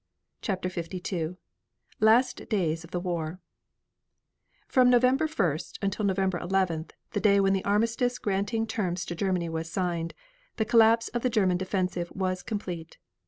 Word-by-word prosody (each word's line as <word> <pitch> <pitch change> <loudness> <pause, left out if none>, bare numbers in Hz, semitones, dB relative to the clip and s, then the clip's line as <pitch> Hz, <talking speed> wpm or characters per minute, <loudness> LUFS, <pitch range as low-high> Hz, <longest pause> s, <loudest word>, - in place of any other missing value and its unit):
CHAPTER 185 -4 -2
LII 175 -1 -3 0.6
LAST 230 +4 +3
DAYS 165 -6 0
OF 165 - -12
THE 180 - -2
WAR 175 -1 -3 1.3
From 250 -1 +5
November 255 +5 +4
1st 175 - -1
until 200 +2 -1
November 190 -2 +1
11th, 175 -4 -1 0.2
the 205 - -1
day 200 -1 +4
when 195 0 +3
the 195 - 0
armistice 230 +4 +1
granting 205 +3 -1
terms 185 -6 -2
to - - -4
Germany 180 -1 0
was 165 0 -4
signed, 170 -2 -2 0.4
the 220 - 0
collapse 230 0 +5
of 240 - -2
the 255 - +1
German 190 -6 +2
defensive 185 -2 -2
was 185 -1 -1
complete. 180 -6 -5
190 Hz, 145 wpm, -28 LUFS, 175-220 Hz, 1.3 s, From